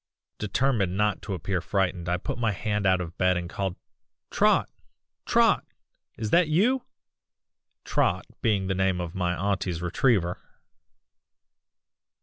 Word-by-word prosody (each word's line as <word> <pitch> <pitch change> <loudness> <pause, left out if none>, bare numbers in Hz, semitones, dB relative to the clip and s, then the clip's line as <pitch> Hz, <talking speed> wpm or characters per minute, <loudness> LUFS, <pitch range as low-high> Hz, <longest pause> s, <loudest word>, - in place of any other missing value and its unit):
"Determined 105 -3 0
not 105 0 +1
to 100 -3 -4
appear 90 +1 -2
frightened 90 -1 -1
I 90 - +1
put 90 - -5
my 110 -3 +1
hand 105 +1 -1
out 95 -1 +3
of 85 -1 -6
bed 90 -1 +3
and 90 0 -3
called 95 0 -3 0.6
'Trot! - - +3 0.6
Trot! - - +4 0.5
is 110 -1 -3
that 175 -1 +5
you?' 220 +12 +2 1.0
(Trot - - 0 0.2
being 105 -6 +1
the 95 - 0
name 95 -1 +1
of 85 -1 -4
my 90 -1 -1
auntie's 95 -2 -1
retriever.) 90 +1 +1
95 Hz, 130 wpm, -26 LUFS, 90-105 Hz, 1.0 s, that